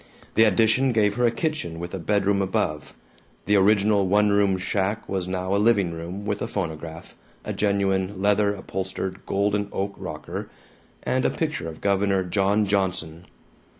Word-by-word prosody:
The 110 Hz, -, +5 dB
addition 115 Hz, +5 st, +3 dB
gave 105 Hz, -2 st, +3 dB
her 120 Hz, +2 st, +2 dB
a -, -, +2 dB
kitchen 120 Hz, -, -3 dB
with 85 Hz, +2 st, -6 dB
a 95 Hz, -, -3 dB
bedroom 100 Hz, +2 st, +1 dB
above. 75 Hz, -5 st, -2 dB, 0.5 s
The 105 Hz, -, +3 dB
original 100 Hz, 0 st, +4 dB
one 105 Hz, +2 st, +3 dB
room 100 Hz, -2 st, +3 dB
shack 95 Hz, +2 st, -2 dB
was 95 Hz, -2 st, -2 dB
now 95 Hz, +1 st, -2 dB
a 100 Hz, -, +2 dB
living 105 Hz, -6 st, +3 dB
room, 85 Hz, +5 st, -6 dB
with 105 Hz, -1 st, -1 dB
the -, -, -3 dB
phonograph, 80 Hz, -3 st, -5 dB, 0.3 s
a -, -, -3 dB
genuine 100 Hz, -1 st, 0 dB
leather 100 Hz, +1 st, +3 dB
upholstered 95 Hz, 0 st, -5 dB
golden 100 Hz, +1 st, 0 dB
oak 100 Hz, +1 st, -2 dB
rocker, -, -, -6 dB, 0.5 s
and 130 Hz, 0 st, 0 dB
a -, -, +3 dB
picture 150 Hz, -, -3 dB
of 80 Hz, -, -11 dB
Governor 100 Hz, -1 st, +2 dB
John 100 Hz, +3 st, +1 dB
Johnson. 90 Hz, -4 st, -2 dB
100 Hz, 160 wpm, -24 LUFS, 95-105 Hz, 0.5 s, The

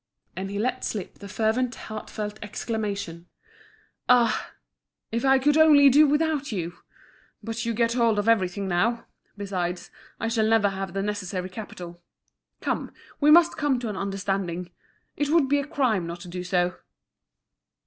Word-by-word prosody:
And 190 Hz, +1 st, -4 dB
he 200 Hz, -, -4 dB
let 255 Hz, +4 st, -1 dB
slip 205 Hz, -4 st, -5 dB
the 200 Hz, -, -9 dB
fervent 225 Hz, +4 st, 0 dB
heartfelt 215 Hz, -1 st, -6 dB
exclamation: 200 Hz, -5 st, -4 dB, 0.8 s
"Ah! 240 Hz, -3 st, +3 dB, 0.6 s
if 230 Hz, +1 st, -1 dB
I 270 Hz, 0 st, +5 dB
could 295 Hz, +3 st, +3 dB
only 295 Hz, -3 st, +7 dB
do 295 Hz, +3 st, +6 dB
without 295 Hz, -1 st, 0 dB
you! 175 Hz, -4 st, -4 dB, 0.7 s
But 230 Hz, +1 st, -4 dB
you 230 Hz, -, -1 dB
get 230 Hz, 0 st, +2 dB
hold 230 Hz, -3 st, +2 dB
of 205 Hz, +1 st, 0 dB
everything 195 Hz, -3 st, +1 dB
now. 215 Hz, +7 st, 0 dB, 0.3 s
Besides, 185 Hz, -3 st, -3 dB, 0.3 s
I 225 Hz, -, -1 dB
shall 225 Hz, -1 st, +1 dB
never 220 Hz, -2 st, +4 dB
have 195 Hz, -2 st, -5 dB
the 195 Hz, -, -1 dB
necessary 190 Hz, -3 st, -3 dB
capital. 175 Hz, -4 st, -9 dB, 0.6 s
Come, -, -, -2 dB, 0.3 s
we 295 Hz, -, +4 dB
must 335 Hz, +2 st, +6 dB
come 290 Hz, -3 st, +1 dB
to 240 Hz, -2 st, -4 dB
an 210 Hz, -, -4 dB
understanding. 195 Hz, -3 st, -3 dB, 0.4 s
It 290 Hz, 0 st, -1 dB
would 315 Hz, -3 st, +4 dB
be 285 Hz, +1 st, +2 dB
a 280 Hz, -, -4 dB
crime 245 Hz, -, 0 dB
not 170 Hz, +1 st, -7 dB
to 180 Hz, -, -9 dB
do 180 Hz, +1 st, -5 dB
so." 180 Hz, 0 st, 0 dB
215 Hz, 160 wpm, -25 LUFS, 190-255 Hz, 0.8 s, only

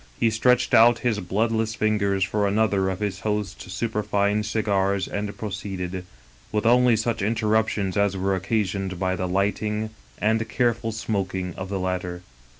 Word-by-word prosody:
He 115 Hz, -1 st, +3 dB
stretched 125 Hz, +3 st, +2 dB
out 120 Hz, +1 st, +7 dB
his 110 Hz, -4 st, +2 dB
bloodless 110 Hz, +4 st, 0 dB
fingers 100 Hz, -3 st, +1 dB
for 100 Hz, +2 st, +1 dB
another 100 Hz, -2 st, +2 dB
of 95 Hz, +1 st, -4 dB
his 100 Hz, -2 st, -2 dB
host's 105 Hz, -3 st, -3 dB
superfine 105 Hz, 0 st, 0 dB
cigars 100 Hz, -2 st, 0 dB
and 100 Hz, 0 st, -4 dB
proceeded, 95 Hz, -3 st, -5 dB, 0.5 s
with 105 Hz, +1 st, -1 dB
only 125 Hz, 0 st, +5 dB
such 110 Hz, 0 st, -1 dB
in 110 Hz, +4 st, +1 dB
terruptions 110 Hz, -3 st, +1 dB
as 100 Hz, -2 st, +1 dB
were 95 Hz, +1 st, 0 dB
occasioned 95 Hz, -1 st, -1 dB
by 95 Hz, -1 st, 0 dB
the 95 Hz, 0 st, -2 dB
lighting 105 Hz, +3 st, -1 dB, 0.3 s
and 110 Hz, +1 st, +1 dB
careful 115 Hz, 0 st, 0 dB
smoking 95 Hz, -4 st, -2 dB
of 95 Hz, +2 st, -6 dB
the 100 Hz, -, -2 dB
latter. 90 Hz, -1 st, -3 dB
105 Hz, 150 wpm, -24 LUFS, 95-110 Hz, 0.5 s, out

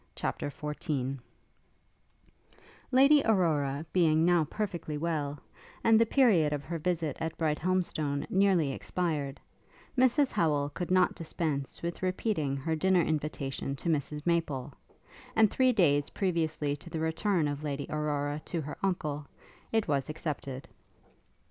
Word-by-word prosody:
CHAPTER -, -, -2 dB
XIV 145 Hz, -3 st, -3 dB, 1.7 s
Lady 275 Hz, +3 st, +6 dB
Aurora 155 Hz, -8 st, +1 dB
being 160 Hz, -3 st, +4 dB
now 175 Hz, -2 st, +4 dB
perfectly 170 Hz, -4 st, -4 dB
well, 150 Hz, -3 st, -2 dB, 0.5 s
and 225 Hz, 0 st, +5 dB
the 230 Hz, -, +4 dB
period 200 Hz, -, +4 dB
of 145 Hz, -1 st, -3 dB
her 165 Hz, +4 st, -4 dB
visit 160 Hz, -3 st, -1 dB
at 160 Hz, 0 st, -3 dB
Brighthelmstone 155 Hz, -2 st, 0 dB
nearly 190 Hz, -7 st, +3 dB
expired, 150 Hz, -2 st, -2 dB, 0.6 s
Mrs 260 Hz, +2 st, +3 dB
Howel 145 Hz, -3 st, +1 dB
could 175 Hz, +3 st, -4 dB
not 185 Hz, 0 st, +4 dB
dispense 155 Hz, -4 st, -3 dB
with 170 Hz, 0 st, -4 dB
repeating 185 Hz, -6 st, -1 dB
her 160 Hz, +4 st, -1 dB
dinner 180 Hz, +2 st, +3 dB
invitation 145 Hz, -3 st, -2 dB
to 170 Hz, -, -4 dB
Mrs 150 Hz, -1 st, -1 dB
Maple; 165 Hz, -7 st, 0 dB, 0.6 s
and, 220 Hz, -2 st, +5 dB
three 255 Hz, -1 st, +4 dB
days 145 Hz, -, +3 dB
previously 160 Hz, -6 st, -1 dB
to 170 Hz, -, -12 dB
the 160 Hz, -, -4 dB
return 160 Hz, +1 st, +1 dB
of 145 Hz, 0 st, -3 dB
Lady 140 Hz, -1 st, -3 dB
Aurora 150 Hz, -1 st, -2 dB
to 170 Hz, -, -2 dB
her 150 Hz, 0 st, -7 dB
uncle, 150 Hz, -6 st, -2 dB, 0.4 s
it 225 Hz, -1 st, +1 dB
was 140 Hz, -3 st, 0 dB
accepted. 140 Hz, -4 st, -5 dB
155 Hz, 130 wpm, -30 LUFS, 145-180 Hz, 1.7 s, Lady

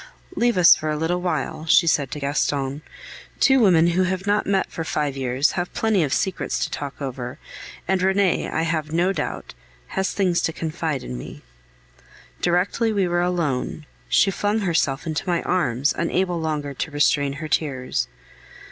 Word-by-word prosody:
"Leave 240 Hz, -, +2 dB
us 175 Hz, -2 st, +8 dB
for 155 Hz, -, -4 dB
a 150 Hz, -, -1 dB
little," 175 Hz, -1 st, -2 dB
she 170 Hz, -, +6 dB
said 145 Hz, -4 st, +2 dB
to 150 Hz, -, -5 dB
Gaston. 140 Hz, 0 st, -1 dB, 0.6 s
"Two 265 Hz, -1 st, +5 dB
women 180 Hz, -8 st, +5 dB
who 175 Hz, +2 st, +1 dB
have 185 Hz, +1 st, -1 dB
not 205 Hz, +1 st, +1 dB
met 195 Hz, -1 st, +1 dB
for 165 Hz, -, -4 dB
five 150 Hz, -3 st, -2 dB
years 130 Hz, +1 st, +1 dB
have 175 Hz, 0 st, -3 dB
plenty 220 Hz, -4 st, +2 dB
of 145 Hz, -4 st, 0 dB
secrets 190 Hz, +1 st, -1 dB
to -, -, -8 dB
talk 140 Hz, -2 st, -5 dB
over, 125 Hz, -3 st, -5 dB, 0.5 s
and 190 Hz, 0 st, +1 dB
Renee, 190 Hz, -1 st, +2 dB
I 160 Hz, -, -1 dB
have 160 Hz, -2 st, -2 dB
no 175 Hz, +4 st, +2 dB
doubt, -, -, -4 dB, 0.4 s
has 190 Hz, 0 st, -1 dB
things 185 Hz, -4 st, +1 dB
to 165 Hz, -, -1 dB
confide 155 Hz, -4 st, -3 dB
in 60 Hz, 0 st, -6 dB
me." -, -, -10 dB, 1.0 s
Directly 185 Hz, +6 st, +1 dB
we 200 Hz, -3 st, +1 dB
were 175 Hz, 0 st, +1 dB
alone, 160 Hz, -4 st, -1 dB, 0.2 s
she 195 Hz, -, +4 dB
flung 205 Hz, +3 st, 0 dB
herself 165 Hz, -7 st, 0 dB
into 160 Hz, +3 st, -3 dB
my 175 Hz, -1 st, +1 dB
arms, 140 Hz, -6 st, +1 dB
unable 175 Hz, +1 st, 0 dB
longer 150 Hz, -3 st, -2 dB
to 140 Hz, -, -4 dB
restrain 145 Hz, -1 st, +2 dB
her 155 Hz, +2 st, -6 dB
tears. 140 Hz, -4 st, -1 dB
165 Hz, 170 wpm, -23 LUFS, 145-185 Hz, 1.0 s, us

